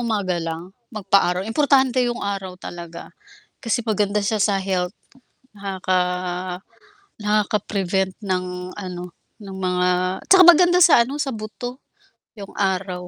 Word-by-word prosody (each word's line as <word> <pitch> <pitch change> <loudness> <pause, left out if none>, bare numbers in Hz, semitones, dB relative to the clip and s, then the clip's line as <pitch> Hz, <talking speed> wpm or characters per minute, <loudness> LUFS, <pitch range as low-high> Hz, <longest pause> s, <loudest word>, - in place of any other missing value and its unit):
umaga 205 -7 -1
lang. 165 +2 -5 0.2
Magpa-araw, 195 -4 +1
importante 265 +1 +2
yung 240 - -4
araw 195 -2 -4
talaga 170 -2 -9 0.5
kasi 235 +1 0
maganda 210 -1 +1
siya 205 0 -1
sa 200 -2 +1
health. 185 -2 -1 0.6
Nakaka 190 -2 -1 1.2
nakaka-prevent 200 -3 0
ng 180 -1 -3
ano, 180 -3 -7 0.3
ng 200 -3 -10
mga 180 -1 0 0.4
tsaka 380 -1 +7
maganda 350 +1 +6
sa 290 -8 +7
ano, 285 +4 -6
sa 275 - -2
buto 230 +4 -7 0.6
yung 200 -2 -10
araw. 185 -2 -2
195 Hz, 120 wpm, -21 LUFS, 180-220 Hz, 1.2 s, tsaka